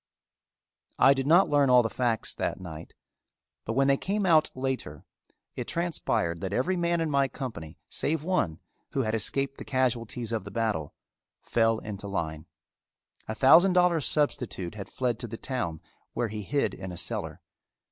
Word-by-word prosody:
I 135 - +7
did 135 0 -2
not 175 +5 +6
learn 145 -2 +3
all 125 -1 +6
the - - +1
facts 120 -3 0
that - - -3
night, 80 -4 -9 0.7
but 115 - -2
when 135 +2 +3
they 140 0 +4
came 200 +4 -1
out 160 -4 +5
later, 130 - -4 0.5
it - - -5
transpired 140 - -1
that 95 0 -3
every 155 - +1
man 170 -1 +1
in 160 -2 -1
my 140 -1 +3
company, 85 - -7
save 155 0 -1
one, 160 - 0 0.3
who 135 - +1
had 110 -1 -1
escaped 135 +5 0
the - - -6
casualties 120 -3 -1
of 115 -4 -1
the 100 - -8
battle, 105 -9 -2 0.5
fell 115 -1 +2
into 105 -2 -7
line. 80 -5 -4 0.8
A 110 - -3
thousand 165 +10 +6
dollar 180 -2 +4
substitute 125 - 0
had 100 -2 -8
fled 125 -3 -1
to 120 - -2
the 115 +1 -7
town 100 - -3 0.3
where 120 - -1
he 105 0 -5
hid 140 +8 0
in 95 -1 -7
a 90 - -8
cellar. - - -4
125 Hz, 170 wpm, -28 LUFS, 100-145 Hz, 0.8 s, I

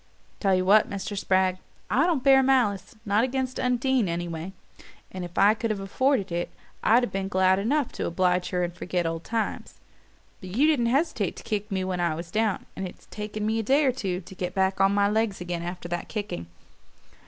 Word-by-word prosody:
"Tell 195 -2 +3
you 185 0 +1
what, 210 +3 +5
Mr. 200 +1 -4
Spragg, 185 -1 +1 0.3
I 260 - +2
don't 315 -8 0
bear 270 -1 +7
malice 235 -8 +1
not 210 +2 +2
against 260 0 -2
Undine, 250 -3 +1
anyway 170 +1 -4 0.6
and 185 -1 -5
if 175 -1 -9
I 205 +2 +6
could 225 +1 -3
have 215 -2 -1
afforded 200 +1 0
it 175 +1 -2 0.3
I'd 240 +3 +5
have 245 - -2
been 195 0 -2
glad 190 0 +3
enough 270 +6 0
to - - -3
oblige 180 +1 +1
her 180 -1 0
and 175 0 -3
forget 175 0 -2
old 165 0 -3
times. 225 -1 -3 0.6
But 185 0 -8
you 275 +5 +4
didn't 290 -7 +3
hesitate 255 - 0
to - - -10
kick 210 -2 -3
me 190 -1 -1
when 185 -1 -2
I 170 -3 +1
was 170 +1 -7
down 215 -1 0
and 190 - -4
it's - - -14
taken 210 0 -4
me 220 +1 +1
a - - +1
day 275 +7 +3
or 260 - +4
two 195 -7 -3
to 185 - -12
get 180 0 -5
on 190 +1 +3
my 200 0 +3
legs 215 -1 0
again 175 -1 -4
after 175 0 -6
that 175 0 -4
kicking. 205 - -4
195 Hz, 210 wpm, -26 LUFS, 180-230 Hz, 0.6 s, bear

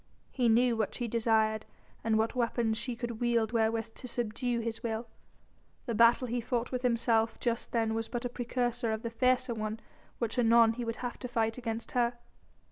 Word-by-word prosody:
He 245 -3 +2
knew 240 +1 +4
what 220 -2 -1
she 240 - -2
desired 220 -1 +2 0.4
and 225 -1 +2
what 220 +1 +1
weapons 235 -2 0
she 245 -1 -3
could 235 -1 -5
wield 235 -2 +2
wherewith 225 -1 0
to 250 - -9
subdue 240 +1 -2
his 230 0 -4
will. 230 0 -3 0.8
The 235 - -2
battle 235 +3 +5
he 240 0 -2
fought 235 +1 -2
with 250 -1 -2
himself 230 -2 +2
just 235 -1 -2
then 225 -2 +1
was 225 0 -2
but 240 +1 -4
a - - -1
precursor 245 -1 -1
of 220 - -4
the 230 - -3
fiercer 255 +1 +2
one 215 0 -3 0.4
which 235 +1 -1
anon 230 -1 +6
he 240 +1 -4
would 230 0 -2
have 240 - -5
to 250 - -5
fight 225 -1 0
against 230 -1 -4
her. 240 -1 +1
230 Hz, 195 wpm, -31 LUFS, 225-245 Hz, 0.8 s, anon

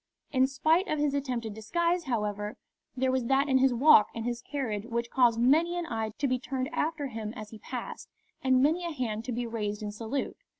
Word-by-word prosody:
In 260 -1 +4
spite 315 +7 +2
of 305 - -1
his 290 -1 +1
attempted 250 -6 -2
disguise, 340 - 0
however, 210 -2 -2 0.4
there 260 0 +2
was 260 -2 0
that 270 +3 +2
in 265 -2 +4
his 265 0 +4
walk 245 -3 +6
and 230 0 -4
his 240 -1 -2
carriage 230 -8 -3
which 235 0 -3
caused 240 -3 +4
many 320 +8 +3
an 350 - -2
eye 225 -4 -2
to 290 - 0
be 255 -1 0
turned 260 +1 -3
after 320 -2 -1
him 220 -4 -5
as 215 -1 -8
he 220 - -10
passed 245 +2 -7 0.3
and 260 0 +4
many 325 +5 +2
a 340 - -2
hand 225 -6 -3
to 255 - -3
be 240 +1 -2
raised 215 -2 -3
in 210 - -3
salute. 225 +6 -4
255 Hz, 215 wpm, -29 LUFS, 225-285 Hz, 0.4 s, walk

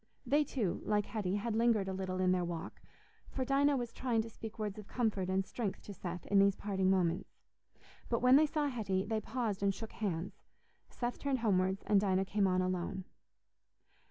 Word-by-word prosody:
They, 290 +5 +3
too, 240 -10 -2
like 210 -1 +1
Hetty, 200 -4 -2
had 215 +2 -1
lingered 225 -4 +3
a 190 - -2
little 185 -1 -3
in 185 0 +3
their 180 -1 +2
walk, 170 -1 -5 0.5
for 260 - -2
Dinah 280 +1 +3
was 240 -2 -4
trying 235 -4 0
to 225 - -9
speak 220 +1 -8
words 210 -1 -3
of 210 - -10
comfort 210 -6 -1
and 190 0 +1
strength 205 -4 -4
to 205 - -8
Seth 180 -1 -6
in 200 - +3
these 200 0 +5
parting 190 -2 0
moments. 180 -2 0 0.7
But 235 0 0
when 250 +1 +7
they 305 +2 +6
saw 300 0 0
Hetty, 205 -8 -1
they 220 0 -1
paused 220 -3 -2
and 200 -1 +2
shook 225 +2 -7
hands; 185 -4 -3 0.6
Seth 240 0 -3
turned 270 -4 -1
homewards, 190 -3 +1
and 205 -2 +4
Dinah 190 -1 +2
came 200 0 +2
on 185 0 +2
alone. 185 +1 -2
205 Hz, 195 wpm, -34 LUFS, 190-235 Hz, 0.7 s, when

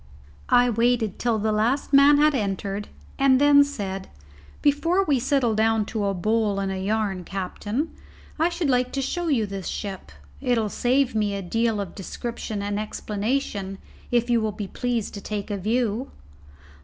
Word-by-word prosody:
I 245 0 +5
waited 230 -2 +1
till 235 -2 +1
the 215 +1 0
last 235 +7 0
man 280 +1 +7
had 300 +1 +4
entered, 200 -3 -2 0.3
and 270 -1 +5
then 285 0 +7
said, 195 -9 -5 0.5
"Before 330 +7 +3
we 285 -6 +2
settle 260 -2 +1
down 220 0 +2
to 215 -3 0
a 195 -1 0
bowl 215 +1 +1
and 195 -1 -1
a 190 - -3
yarn, 200 -2 -1
captain, 205 - -3 0.5
I 330 +2 +3
should 340 -2 -2
like 250 -1 +2
to 275 - -1
show 345 +6 -2
you 255 -8 +2
this 195 -2 -6
ship. 195 - -5 0.3
It'll 230 -4 +1
save 255 +3 +1
me 210 -2 0
a 195 - -4
deal 225 +3 0
of 195 -4 -4
description 215 +1 -5
and 205 0 -2
explanation 210 -2 -3 0.3
if 240 -1 +2
you 235 -2 +2
will 215 -1 0
be 205 0 -5
pleased 240 0 -2
to 200 - -7
take 210 0 -4
a 205 - -1
view." 230 +4 0
220 Hz, 170 wpm, -24 LUFS, 200-260 Hz, 0.5 s, man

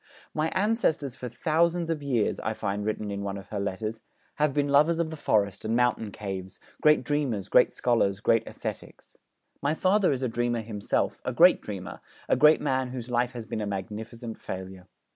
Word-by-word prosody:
'My 155 +1 0
ancestors 185 - +1
for 125 -1 -6
thousands 165 +6 +1
of 155 -2 -2
years,' 125 -7 0
I 110 - -2
find 105 -1 -2
written 105 -1 -2
in 100 0 -4
one 100 0 -3
of 100 - -11
her 105 - -3
letters, 110 +3 -3 0.4
'have 150 -1 +2
been 145 +1 +1
lovers 150 +4 +4
of 165 -1 -1
the - - -5
forest 105 -8 0
and 110 +1 0
mountain 120 -3 +1
caves, 95 -2 -6 0.2
great 150 0 +5
dreamers, 130 -10 -1
great 125 - +5
scholars, 105 -5 +1
great 115 +1 +3
ascetics. - - -7 0.5
My 145 +3 +1
father 190 +1 +3
is 135 -1 -1
a - - +2
dreamer 120 0 -1
himself, 105 -2 -2
a - - -2
great - - +6
dreamer, - - -7 0.3
a - - +3
great 150 +1 +6
man 130 -3 0
whose 125 -1 -6
life 120 +1 +1
has 120 -2 -6
been 110 - -4
a 105 - -2
magnificent 110 +4 -6
failure. 95 0 -7
120 Hz, 190 wpm, -27 LUFS, 105-145 Hz, 0.5 s, great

